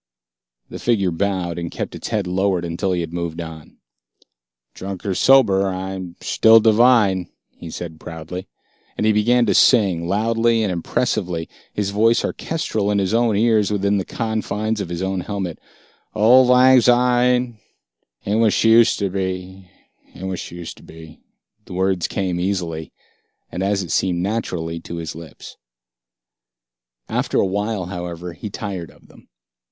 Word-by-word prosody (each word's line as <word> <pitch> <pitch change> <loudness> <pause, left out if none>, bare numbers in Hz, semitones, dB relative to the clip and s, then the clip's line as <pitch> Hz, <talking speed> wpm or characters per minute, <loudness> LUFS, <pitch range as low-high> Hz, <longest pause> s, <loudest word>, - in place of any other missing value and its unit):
The - - -8
figure 100 -6 +1
bowed, 90 -1 -2
and 85 -1 -4
kept - - -5
its - - -6
head 105 -3 -1
lowered 90 -1 0
until 85 +3 -2
he 90 -1 0
had 85 0 -6
moved 85 -1 -4
on. 80 -2 -9 1.0
"Drunk 95 0 -7
or 100 - 0
sober, 100 -5 +4
I'm 95 -1 -5
shtill 115 0 +5
divine," 110 -5 +4 0.2
he 85 - -11
said 80 -1 -7
proudly. 85 +3 -8 0.5
And - - 0
he 110 - +4
began 120 +3 +3
to 105 - +2
sing, 95 -9 +4
loudly 115 +3 +1
and 100 - 0
impressively, 90 -1 -2 0.2
his 100 -1 -2
voice 115 +3 +3
orchestral 110 -11 -2
in 105 - +1
his 100 +1 0
own 115 -2 +2
ears 110 -2 +3
within 100 -1 +1
the - - -2
confines 110 -1 -2
of 100 - -4
the 90 +2 -3
helmet. 95 -5 -4 0.6
"Ould 120 +4 +6
Lang 125 +1 +6
Shyne, 125 -1 +2 0.6
she 100 - -4
ain't 110 - +2
what 110 -2 +3
she 115 +1 +6
ushed 115 - +2
to 100 -2 -1
be, 95 0 -5 0.5
ain't 95 - -8
what 95 -2 -3
she 85 - -8
ushed 85 - -8
to - - -17
be 80 -1 -13 0.2
" 105 0 -48
The - - -10
words 95 -1 0
came 90 -3 -2
easily, 85 -4 -3 0.6
and 90 - -4
as 100 0 0
it 85 - -7
seemed, 90 -1 0
naturally 90 -6 -3
to 85 - -8
his 80 -2 -5
lips. 80 -1 -12 1.5
After - - -1
awhile, 100 0 0
however, 90 -1 -6
he 105 +6 -7
tired 95 -6 -6
of - - -21
them. - - -20
95 Hz, 160 wpm, -20 LUFS, 90-110 Hz, 1.5 s, Ould